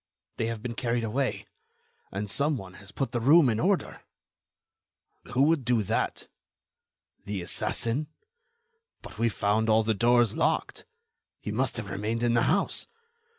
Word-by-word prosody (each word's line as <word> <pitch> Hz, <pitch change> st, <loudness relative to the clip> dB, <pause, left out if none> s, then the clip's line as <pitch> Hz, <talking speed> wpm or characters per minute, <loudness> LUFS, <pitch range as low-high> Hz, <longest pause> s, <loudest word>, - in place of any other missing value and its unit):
They 115 Hz, -, -1 dB
have 115 Hz, -2 st, -5 dB
been 120 Hz, -, -3 dB
carried 120 Hz, 0 st, -1 dB
away. 125 Hz, +4 st, -2 dB, 0.7 s
And 100 Hz, +2 st, -3 dB
some 140 Hz, +7 st, 0 dB
one 95 Hz, -4 st, -9 dB
has 100 Hz, 0 st, -11 dB
put 135 Hz, 0 st, -3 dB
the 120 Hz, -, -1 dB
room 145 Hz, +4 st, +6 dB
in 110 Hz, -1 st, 0 dB
order." 190 Hz, +5 st, 0 dB, 1.3 s
"Who 130 Hz, -, +4 dB
would 155 Hz, -2 st, +3 dB
do 120 Hz, -2 st, +2 dB
that?" -, -, -2 dB, 1.0 s
"The 100 Hz, -3 st, -4 dB
assassin." 115 Hz, +10 st, 0 dB, 1.0 s
"But -, -, -11 dB
we 115 Hz, 0 st, +3 dB
found 105 Hz, +2 st, 0 dB
all 110 Hz, +1 st, +4 dB
the 110 Hz, 0 st, +1 dB
doors 120 Hz, +1 st, +3 dB
locked." -, -, -1 dB, 0.5 s
"He -, -, -5 dB
must -, -, 0 dB
have -, -, -6 dB
remained 110 Hz, +4 st, -2 dB
in 120 Hz, -1 st, +2 dB
the 115 Hz, -, +3 dB
house." 195 Hz, +5 st, 0 dB
115 Hz, 150 wpm, -27 LUFS, 110-130 Hz, 1.3 s, room